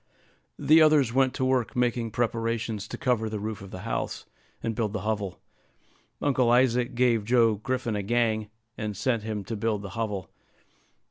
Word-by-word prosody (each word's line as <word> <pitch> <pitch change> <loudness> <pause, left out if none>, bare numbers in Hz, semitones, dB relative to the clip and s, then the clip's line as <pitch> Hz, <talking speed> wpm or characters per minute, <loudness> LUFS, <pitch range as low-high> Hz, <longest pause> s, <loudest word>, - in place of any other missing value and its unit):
The 160 +2 +5
others 150 -6 +5
went 130 0 +2
to 130 - 0
work 130 -3 +1
making 120 -1 0
preparations 115 -2 -2
to - - -6
cover 120 -4 0
the 105 -1 -4
roof 110 0 -4
of 100 - -9
the 95 - -8
house, - - -3 0.4
and 115 - -1
build 105 -2 -2
the 105 - -2
hovel. 105 -4 -2 0.8
Uncle 130 -4 +3
Isaac 125 0 +3
gave 120 -3 +3
Joe 115 0 +4
Griffin 120 +1 -2
a 105 - -1
gang, 110 0 0 0.3
and 105 -3 -3
set 115 +1 0
him 105 -1 -4
to 115 +4 -5
build 105 -1 -1
the 100 - -6
hovel. 100 -2 -4
115 Hz, 175 wpm, -27 LUFS, 105-125 Hz, 0.8 s, The